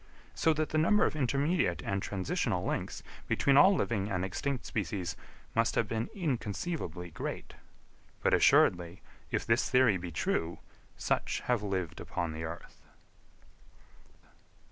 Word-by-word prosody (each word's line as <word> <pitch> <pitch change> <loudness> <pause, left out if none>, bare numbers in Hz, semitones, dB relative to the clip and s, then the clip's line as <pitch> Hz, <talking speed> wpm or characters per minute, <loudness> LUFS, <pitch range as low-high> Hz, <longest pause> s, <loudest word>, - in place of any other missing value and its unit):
So 160 - +2
that 155 0 -1
the 155 - +1
number 210 +7 +4
of - - -1
intermediate 140 - +1
and 100 0 -1
transitional 95 -2 -1
links, - - -3 0.2
between 140 - +3
all 190 +8 +7
living 105 - -1
and 95 -2 -1
extinct 130 +7 -3
species, 95 -6 -3 0.4
must 115 0 +2
have 115 - +2
been 115 +2 -2
inconceivably 120 - -3
great. - - -5 0.7
But - - +3
assuredly, 85 +1 +4 0.3
if - - -1
this 115 +2 +2
theory 125 -6 +4
be 85 -1 -6
true, 80 +1 -1 0.4
such - - -1
have 125 -3 0
lived 95 -5 -3
upon 85 -2 -3
the 80 +1 -5
earth. 80 +2 -9
105 Hz, 135 wpm, -31 LUFS, 90-140 Hz, 0.7 s, all